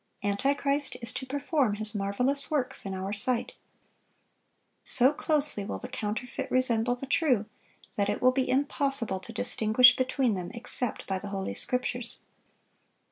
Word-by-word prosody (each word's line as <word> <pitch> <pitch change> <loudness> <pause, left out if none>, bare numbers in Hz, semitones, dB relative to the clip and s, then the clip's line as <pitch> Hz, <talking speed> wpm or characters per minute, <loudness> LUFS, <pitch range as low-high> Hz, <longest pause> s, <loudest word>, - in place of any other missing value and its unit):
Antichrist 275 +7 0
is 235 -2 -4
to 260 - -6
perform 285 -4 0
his 215 0 +2
marvelous 250 +8 +1
works 260 -8 -2
in 190 - -4
our 190 +2 -4
sight. 235 +4 -2 1.3
So 260 +3 +6
closely 295 -8 +1
will 200 - -5
the - - -8
counterfeit 250 0 -5
resemble 245 -2 +2
the 250 - -8
true, 260 -6 +1 0.5
that 200 -1 +1
it 205 - -1
will 255 - +4
be 255 0 -1
impossible 270 -5 +1
to 185 - -11
distinguish 220 - +4
between 255 -2 0
them 180 -2 -5
except 235 0 -3
by 190 -1 -3
the 205 - -8
Holy 195 -1 -4
Scriptures. 250 -1 -1
250 Hz, 145 wpm, -28 LUFS, 205-270 Hz, 1.3 s, So